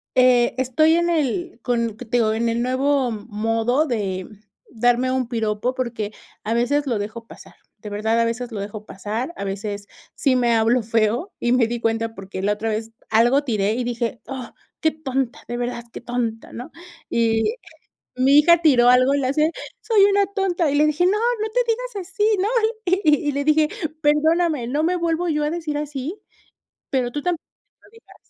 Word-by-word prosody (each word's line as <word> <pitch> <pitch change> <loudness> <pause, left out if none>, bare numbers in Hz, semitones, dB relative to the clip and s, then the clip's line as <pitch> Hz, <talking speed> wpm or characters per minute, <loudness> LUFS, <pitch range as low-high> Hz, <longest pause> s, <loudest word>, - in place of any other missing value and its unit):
eh, 250 -2 +4
estoy 265 +5 +3
en 345 0 +1
el 335 -1 -1
con 235 -3 -1
que 230 - -9
te 240 +2 0
digo, 220 -2 +2
en 230 +1 0
el 230 +1 -1
nuevo 260 +1 +1
modo 225 +5 0
de 195 -8 -2 0.4
darme 245 +2 +2
un 260 -2 0
piropo, 225 0 -1
porque 235 -5 -3 0.3
a 220 - -1
veces 280 +5 +1
lo 240 -6 -1
dejo 215 +3 -6
pasar, - - -14 0.2
de 210 0 -9
verdad, 220 +3 0
a 230 - +3
veces 240 +1 -3
lo 215 - -5
dejo 205 +1 -6
pasar, 220 - -4
a - - -4
veces 200 +1 -5 0.3
sí 270 -3 +2
me 240 -2 +2
hablo 230 +2 +3
feo 225 - 0
y 240 - 0
me 250 -3 +3
di 240 +1 -3
cuenta, 225 0 -1
porque 195 -2 -7
la 205 +2 +1
otra 220 +2 -3
vez 220 +1 -3 0.2
algo 240 +6 +4
tiré 210 -4 0
y 250 0 -2
dije: 240 -1 -3
"Ah, 265 -3 -7 0.3
qué 315 - +3
tonta, 270 -3 -3
de 240 - -4
verdad, 240 -1 -4
qué - - -7
tonta", 240 -2 -3
¿no?, 245 +2 -8 0.4
y 230 - +1 0.6
mi 270 +3 +5
hija 340 +3 +6
tiró 260 -7 +5
algo 255 +2 +5
y 285 - +2
le 260 - 0
hace: 305 +4 +2 0.3
"Soy 445 -3 +3
una 400 0 +3
tonta", 375 -5 0
y - - 0
le 300 +1 +4
dije: 305 +3 +2
"No, - - +3
no 440 +1 0
te - - +2
digas 455 -5 -3
así," 390 +2 -2 0.2
¿no?, 385 - +1 0.4
y 375 +2 +2 0.3
y - - +1
le 285 +1 -1
dije: 305 +1 +3 0.3
"Perdóname, 305 -2 +2
no 290 +5 0
me 350 +3 +1
vuelvo 340 0 0
yo 300 -2 0
a 295 - 0
decir 315 -3 -3
así, 295 +6 -5 0.7
pero 250 -3 0
tú 290 - -3
tampoco 350 -1 -2 0.4
te - - -22
lo - - -21
digas". 455 - -18
250 Hz, 195 wpm, -22 LUFS, 225-305 Hz, 0.7 s, hija